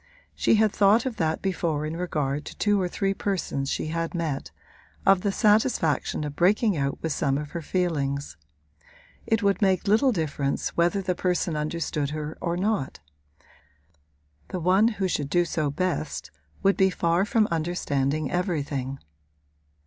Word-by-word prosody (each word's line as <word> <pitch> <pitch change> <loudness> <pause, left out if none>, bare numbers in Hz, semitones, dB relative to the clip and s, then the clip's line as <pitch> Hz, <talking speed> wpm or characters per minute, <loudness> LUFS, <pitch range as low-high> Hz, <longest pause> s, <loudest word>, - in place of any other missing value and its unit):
She - - +3
had 215 -1 +3
thought 210 +4 +4
of 255 -4 -3
that 160 -1 -1
before 165 -6 -1
in 155 +1 -4
regard 150 -5 -2
to - - -9
two 205 -2 +2
or 180 - 0
three 195 +2 -1
persons 185 -9 -2
she 155 - -2
had 165 +1 -2
met 155 -5 -2 0.6
of 195 -1 +5
the 200 - 0
satisfaction 210 - +2
of 145 -1 -5
breaking 200 +5 +3
out 140 -2 -1
with 160 - -1
some 140 -1 +1
of 150 0 -5
her 170 - -4
feelings. 145 - -1 0.9
It 225 -1 +1
would 200 +2 +2
make 190 -1 +2
little 225 +6 +4
difference 150 - -1
whether 175 +4 +1
the 180 - 0
person 180 -2 -1
understood 150 -1 -2
her 155 +1 -5
or 170 0 -1
not; 195 -8 -1 1.5
the 185 - -4
one 185 +6 +4
who 205 -5 -1
should 145 -5 -2
do 175 +3 +3
so 155 -3 -1
best 75 - -2 0.3
would 195 0 +3
be 190 0 +4
far 170 0 +1
from 215 +1 +2
understanding 155 -4 -1
everything. 145 -7 -2
170 Hz, 155 wpm, -26 LUFS, 150-195 Hz, 1.5 s, of